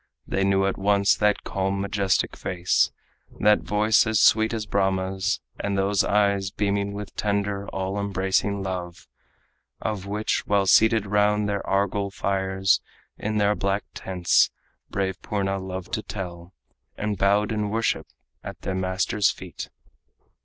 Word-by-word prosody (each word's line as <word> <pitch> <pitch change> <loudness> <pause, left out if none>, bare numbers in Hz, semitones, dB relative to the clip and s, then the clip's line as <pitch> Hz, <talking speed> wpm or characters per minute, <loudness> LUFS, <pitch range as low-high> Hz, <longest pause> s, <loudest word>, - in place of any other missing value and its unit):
They 95 - -1
knew 95 0 +3
at 95 - -1
once 100 0 +3
that 105 -1 +1
calm, 95 0 -1
majestic 100 -1 0
face, 90 -1 +1 0.5
That 105 0 +5
voice 105 +2 +2
as 110 -1 +2
sweet 110 0 +5
as 110 -2 -3
Brahma's, 95 -1 0 0.2
and 100 -1 -1
those 100 +1 +2
eyes 100 -2 +2
Beaming 100 0 -1
with 105 0 -7
tender, 100 -1 -1
all 95 +1 -3
embracing 100 0 0
love, 90 -2 -5 0.7
Of 100 -3 -3
which, 105 +2 -1
while 100 -1 +2
seated 110 +2 +5
round 105 +1 +2
their 100 -1 -2
argol 100 +1 0
fires 95 -1 +1 0.4
In 110 0 -2
their 105 0 +3
black 100 0 -1
tents, 90 -2 +2 0.4
brave 95 -1 -2
Purna 95 -1 -1
loved 95 -1 -6
to 110 - 0
tell, 90 -4 -7 0.5
And 105 0 -1
bowed 100 +3 +2
in 105 -1 -1
worship 115 +2 0 0.4
at - - -8
the 95 - -3
master's 95 +2 +1
feet. - - -7
100 Hz, 140 wpm, -25 LUFS, 95-105 Hz, 0.7 s, That